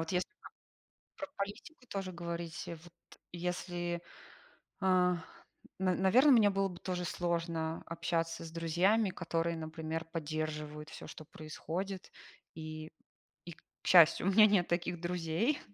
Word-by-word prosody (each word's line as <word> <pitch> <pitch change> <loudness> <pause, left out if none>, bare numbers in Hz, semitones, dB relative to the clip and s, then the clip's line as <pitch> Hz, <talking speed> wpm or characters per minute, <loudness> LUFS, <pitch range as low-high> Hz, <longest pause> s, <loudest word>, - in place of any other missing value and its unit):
вот 165 +2 -3
если 180 0 +1
там 420 - -15 0.7
про 290 - -4
политику 210 +8 -6
тоже 195 -2 -3
говорить, 170 -1 -5
вот 170 +1 -9 0.4
если, 175 0 -3 0.8
а, 180 -2 +4 0.6
на 185 -1 +2
наверно, 240 +11 +6
мне 220 -5 +7
было 195 0 +1
бы 180 -2 -9
тоже 180 -2 -2
сложно 165 -1 -1
общаться 165 0 -1
с 160 - -8
друзьями, 180 +6 +2
которые, 170 -1 -1
например, 160 0 -4
поддерживают 155 -1 -4
всё, - - -9
что 155 - -9
происходит. 175 +6 -5 0.4
И 155 0 -7 0.6
и - - -6
к 165 - -15 0.3
счастью, 170 0 +7
у - - +5
меня 215 +2 +9
нет 195 -4 +3
таких 175 0 -1
друзей. 175 - 0
175 Hz, 135 wpm, -33 LUFS, 165-185 Hz, 0.8 s, меня